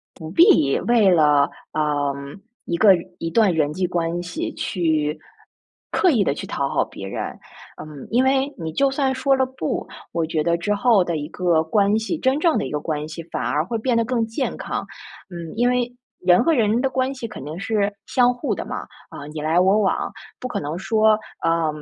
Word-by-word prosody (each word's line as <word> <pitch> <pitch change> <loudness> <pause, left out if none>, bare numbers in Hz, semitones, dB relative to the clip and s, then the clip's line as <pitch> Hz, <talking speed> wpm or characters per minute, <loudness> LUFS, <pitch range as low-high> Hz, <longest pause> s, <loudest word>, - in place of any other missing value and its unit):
不 160 -2 -8
必 330 - +5
为 230 -5 +4
了， 150 -4 +4 0.2
呃， 145 -2 0 0.5
一 170 - -1
个 195 +1 +6 0.2
一 165 - -3
段 210 0 +3
人 150 -2 +1
际 180 +3 -1
关 170 0 -1
系 180 - -4
去 155 -3 -1 0.7
刻 370 - +3
意 230 -9 +3
地 140 - +1
去 - - -7
讨 140 - -1
好 - - +1
别 95 - -9
人。 95 - -4 0.5
嗯， 150 -3 -9
因 245 +3 +3
为 270 +1 +2
你 160 -2 -5
就 275 0 +3
算 270 -1 0
说 270 +1 +2
了 260 0 +2
不， 260 0 -4 0.2
我 165 -1 0
觉 160 -1 -1
得 170 +1 +1
之 205 +5 -1
后 220 -2 +4
的 170 -2 -2
一 150 0 -5
个 170 -3 +1
关 205 +5 +2
系， 230 +9 -3
真 270 0 +1
正 325 -1 +3
的 - - -1
一 - - -6
个 150 - -1
关 150 0 -3
系 160 +2 -7
反 - - -2
而 150 - +1
会 225 +7 -3
变 235 +2 0
得 230 - +3
更 230 0 0
健 225 +5 -3
康。 - - -4 0.4
嗯， 170 -3 -7
因 240 +2 +2
为 245 -1 0 0.3
人 180 +4 +4
和 330 - +3
人 230 -3 +2
的 270 - +1
关 260 +1 -1
系 255 - -6
肯 215 -11 -9
定 155 +2 -6
是 205 0 0
相 250 -1 +3
互 245 +4 -2
的 - - -5
嘛， - - -5 0.3
啊， 145 - -9
你 155 - -6
来 160 +3 +1
我 190 +3 +4
往。 200 -3 0 0.3
不 255 - -5
可 - - -2
能 150 +3 -4
说， 215 +3 +3 0.2
呃， 165 -1 +1
195 Hz, 225 characters per minute, -22 LUFS, 160-245 Hz, 0.7 s, 个